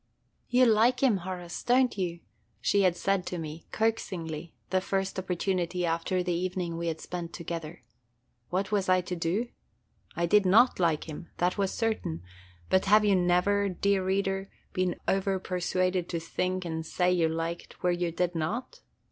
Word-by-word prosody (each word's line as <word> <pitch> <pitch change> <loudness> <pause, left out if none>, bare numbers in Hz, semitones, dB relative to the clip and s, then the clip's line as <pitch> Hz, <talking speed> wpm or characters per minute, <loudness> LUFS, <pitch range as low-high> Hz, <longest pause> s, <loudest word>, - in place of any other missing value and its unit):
"You 250 +1 +5
like 235 +3 +4
him, 240 -7 +5
Horace, 180 -1 -6
don't 250 +1 +3
you?" 175 -3 -3 0.4
she 200 - +2
had 180 -2 +3
said 195 0 +1
to 180 - -3
me, 160 0 -7
coaxingly, 170 -8 -2 0.2
the 185 0 +2
first 195 0 -1
opportunity 180 -1 -1
after 170 +2 0
the 180 -1 0
evening 175 -1 -2
we 170 0 -3
had 160 -1 -2
spent 175 -2 -6
together. 170 -1 -6 0.7
What 190 +3 -1
was 200 -3 +1
I 185 0 +5
to 180 0 -4
do? 180 +8 -1 0.7
I 170 - +1
did 205 +4 +5
not 215 +7 +5
like 165 -4 +2
him, 160 +2 -8
that 180 +3 0
was 195 -1 +1
certain; 215 - -2 0.4
but 190 - +3
have 210 +2 +5
you 200 -2 +4
never, 185 +3 +2
dear 195 +1 +1
reader, 195 0 0 0.2
been 185 -1 0
over 195 0 +1
persuaded 185 -1 -1
to 170 - -1
think 185 +2 -2
and 160 -1 -3
say 180 +3 +1
you 170 -3 +3
liked 165 +1 -4
where 180 0 +3
you 175 -1 -1
did 175 +1 0
not? 230 - -3
180 Hz, 170 wpm, -29 LUFS, 170-195 Hz, 0.7 s, You